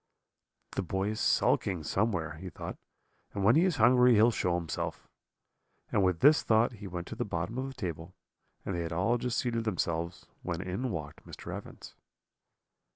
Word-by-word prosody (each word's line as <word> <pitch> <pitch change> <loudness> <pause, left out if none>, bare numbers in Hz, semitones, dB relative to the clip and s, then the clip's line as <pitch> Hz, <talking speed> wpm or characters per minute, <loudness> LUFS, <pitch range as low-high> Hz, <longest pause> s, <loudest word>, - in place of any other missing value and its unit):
"'The - - -2
boy 95 +2 -1
is 110 - -3
sulking 90 -5 +2
somewhere,' 85 -4 -1
he 95 +3 -7
thought, - - -7 0.6
'and 100 - -1
when 110 +6 +6
he 165 +4 +5
is 185 -4 +1
hungry 125 0 +6
he 105 - +5
will 120 - +5
show 90 -5 0
himself;' 85 -2 -4 0.8
and 100 - +2
with 90 -3 +1
this 150 +1 +7
thought 110 +2 +3
he 105 -4 -9
went 90 -1 -5
to - - -7
the - - -2
bottom 115 +3 -3
of 135 - -2
the 135 - -7
table; 85 -6 -5 0.5
and 100 - -2
they 85 - -2
had 85 0 -4
all 95 +9 +1
just 125 +1 -2
seated 115 -2 0
themselves, 85 -4 -2 0.2
when 85 -2 -3
in 95 +8 -3
walked 75 -7 -6
Mr. - - -7
Evans. - - -10
95 Hz, 185 wpm, -30 LUFS, 85-120 Hz, 0.8 s, this